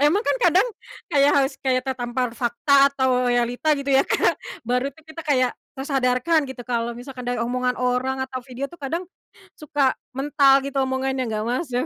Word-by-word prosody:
Emang 305 +9 +3
kan - - +1
kadang 405 -2 +4 0.4
kayak 285 -1 +4
harus 275 -1 +2
kayak 255 -1 +2
tertampar 250 -1 -2
fakta 275 +4 +3
atau 255 -2 +1
realita 245 +5 +1
gitu 280 0 -5
ya, 270 0 +4
Kak? - - +2 0.3
Baru 250 +2 0
tuh 320 - -19
kita 320 +1 -9
kayak, 255 -4 +3 0.2
tersadarkan 270 +3 +1
gitu 255 -2 -8
kalau 235 -1 -1
misalkan 250 0 -8
dari 245 -1 -2
omongan 250 +1 -1
orang 250 +1 0
atau 260 -1 -4
video 260 +1 -5
tuh, 345 - -13
kadang, 320 +6 -3 0.6
suka 290 -3 +1 0.2
mental 275 0 +4
gitu 280 0 -6
omongannya, 265 0 -1
enggak 215 -1 -2
masuk 250 +1 -1
260 Hz, 170 wpm, -23 LUFS, 250-280 Hz, 0.6 s, kadang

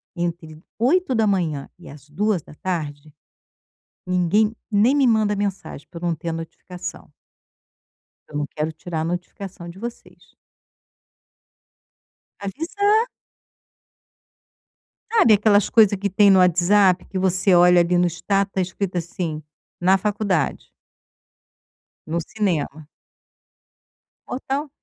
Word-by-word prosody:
entre 170 -2 -4 0.2
8h 220 - +1
e - - -15
às 145 0 -13
14h, 155 -5 -3 0.9
ninguém 185 +5 +1 0.2
nem 220 +6 +4
me 280 -2 +3
manda 215 -3 +2
mensagem 200 -7 -4
para 170 - -8
eu 175 - -3
não 170 - 0
ter 165 +2 -6
a - - -2
notificação. 165 +2 -8 1.2
Eu - - -12
não 150 - -1
quero 155 +2 -3
tirar 160 +1 -5
a - - -1
notificação 175 +1 -6
de 175 +3 -12
vocês. 235 +2 -10 2.0
Avisar. 405 - 0 2.0
Sabe, 430 - +5
aquelas 205 -1 +3
coisa 210 -3 +5
que 200 +1 -2
tem 200 +2 +5
no 195 - +6
WhatsApp 180 +1 +4
que 195 - -6
você 185 +1 +2
olha 175 0 +6
ali 175 +1 +1
no 175 - +3
status 195 +4 -1
tá 190 - 0
escrito 185 0 -3
assim, 170 -2 -4 0.4
na 190 +2 +4
faculdade. 200 -5 -1 1.4
No 165 +2 -2
cinema. 155 -7 -2 1.4
Ou 250 - -4
tal, 280 +3 -3
185 Hz, 115 wpm, -22 LUFS, 170-210 Hz, 2.0 s, no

